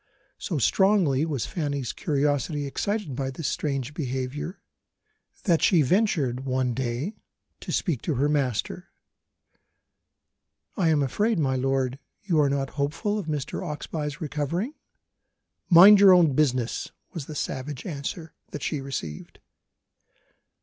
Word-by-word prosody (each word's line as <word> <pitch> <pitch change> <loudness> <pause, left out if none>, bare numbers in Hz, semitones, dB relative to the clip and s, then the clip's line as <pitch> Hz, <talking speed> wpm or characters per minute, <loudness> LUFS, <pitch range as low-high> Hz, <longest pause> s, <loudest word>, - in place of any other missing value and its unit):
So - - -3
strongly 180 -8 +3
was 140 -7 -2
Fanny's 145 -7 -3
curiosity 145 -1 0
excited 200 - -2
by 135 +1 -2
this 135 +3 -4
strange 140 -2 -2
behaviour, 135 +4 -4 0.8
that 170 -6 +2
she 170 -6 +4
ventured 155 - +1
one 130 -2 0
day 130 - -3 0.4
to - - -6
speak 160 - -1
to 155 - -2
her 140 +4 +2
master. 145 - -1 1.9
"I 180 -7 +2
am 150 -3 +3
afraid, 210 - +1
my 135 -4 +1
lord, 135 0 0 0.2
you 175 -6 +1
are 145 -2 +4
not 135 -1 -1
hopeful 205 +9 -1
of 185 - -6
Mr. 150 +1 -3
Oxbye's 150 -3 -4
recovering?" 160 - -2 1.0
"Mind 195 +4 +9
your 195 -2 +8
own 170 -5 +5
business," 130 -5 0 0.2
was 160 -6 -6
the 155 - -7
savage 135 -1 -4
answer 160 0 -5 0.2
that 150 - -7
she 150 - -2
received. 85 - -6
145 Hz, 130 wpm, -26 LUFS, 135-170 Hz, 1.9 s, Mind